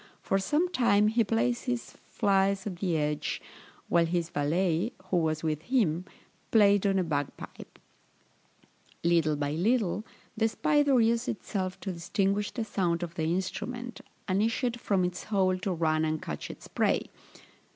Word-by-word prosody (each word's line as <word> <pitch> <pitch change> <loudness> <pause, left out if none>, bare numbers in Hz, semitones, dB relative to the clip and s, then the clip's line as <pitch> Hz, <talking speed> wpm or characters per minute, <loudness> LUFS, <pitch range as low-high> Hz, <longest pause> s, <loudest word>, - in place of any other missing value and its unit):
For 195 - +1
some 300 - +1
time 210 - +4
he 230 +1 +3
placed 230 +3 0
his 245 -2 -2 0.2
flies 195 -1 +1
at 190 -4 -4
the 175 -3 0
edge, 150 -1 -1 0.5
while 170 -1 +3
his 170 0 -1
valet, 170 +7 0 0.2
who 180 - +3
was 155 -2 0
with 155 -1 -1
him, 180 -6 +1 0.4
played 205 -2 +5
on 195 -1 +2
a 185 - +2
bagpipe: 145 -4 -5 1.3
little 165 -3 +3
by 145 0 -2
little, 205 +4 +1 0.3
the 225 0 +2
spider 285 +2 +3
used 230 +2 +2
itself 190 -4 -3
to 190 - -3
distinguish 195 +4 0
the 230 -3 -4
sound 175 -5 0
of 170 -1 -5
the 160 - -2
instrument, 190 +8 -3 0.3
and 190 +1 +1
issued 235 +2 0
from 190 -3 +1
its 180 0 -4
hole 185 -3 +1
to 190 +1 -2
run 160 -2 +1
and 155 0 0
catch - - -5
its - - -10
prey. - - +1
190 Hz, 155 wpm, -29 LUFS, 170-225 Hz, 1.3 s, played